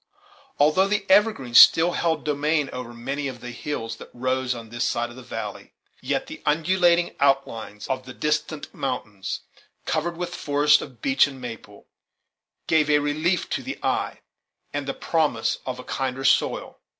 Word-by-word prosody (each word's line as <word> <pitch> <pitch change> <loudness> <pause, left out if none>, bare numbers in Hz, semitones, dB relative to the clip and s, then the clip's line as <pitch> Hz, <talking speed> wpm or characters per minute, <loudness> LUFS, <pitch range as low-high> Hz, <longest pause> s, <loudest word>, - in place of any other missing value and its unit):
Although 155 +7 +4
the 205 0 0
evergreens 190 - +6
still 170 +2 +7
held 165 -2 0
dominion 150 0 0
over 125 -1 -6
many 135 +4 -4
of 130 -2 -6
the 125 - -7
hills 115 -3 -5
that - - -11
rose 130 0 -1
on 115 -2 -9
this 120 +1 -1
side 120 0 -2
of - - -12
the 130 - -10
valley, 110 -4 -7 0.3
yet - - -1
the - - -10
undulating 170 +3 +2
outlines 135 -7 0
of 130 -1 -3
the 125 - -8
distant 150 0 -2
mountains, 125 -8 -4 0.4
covered 165 +2 -1
with 175 0 -4
forests 150 -1 +3
of 125 -4 -11
beech 135 0 +4
and 135 -2 -9
maple, 115 -4 -9 0.8
gave 155 -2 +3
a 150 - +5
relief 155 +5 0
to - - -1
the - - -6
eye, - - -1 0.5
and 145 -1 -3
the 135 - -2
promise 150 -9 0
of 130 -1 -3
a 125 - -8
kinder 135 0 -3
soil. - - +1
140 Hz, 165 wpm, -24 LUFS, 125-155 Hz, 0.8 s, still